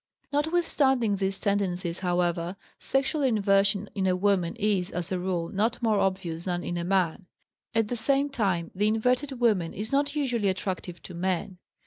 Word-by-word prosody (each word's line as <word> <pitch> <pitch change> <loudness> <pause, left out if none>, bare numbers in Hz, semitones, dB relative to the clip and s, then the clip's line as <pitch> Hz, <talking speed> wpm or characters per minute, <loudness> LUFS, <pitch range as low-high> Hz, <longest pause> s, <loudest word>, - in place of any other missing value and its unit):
Notwithstanding 285 - +2
these 195 0 -1
tendencies, 185 -4 -1
however, 175 -1 0 0.2
sexual 270 +2 0
inversion 200 -4 +2
in 190 -2 0
a 185 - +3
woman 185 -3 +1
is, 200 -3 0
as 175 -2 -4
a 185 - 0
rule, 175 -2 -2
not 225 +4 0
more 215 -3 +3
obvious 185 -4 -1
than 175 -1 -2
in 175 - -3
a - - -2
man. 180 0 0 0.5
At 225 -1 +2
the 245 - -2
same 275 +4 +3
time, 195 -11 -1
the 205 +3 +1
inverted 250 +5 +1
woman 205 -9 +2
is 215 +4 -4
not 285 +1 +1
usually 245 -8 0
attractive 185 -2 -4
to 180 - -9
men. 180 +1 -2
195 Hz, 165 wpm, -27 LUFS, 180-235 Hz, 0.5 s, a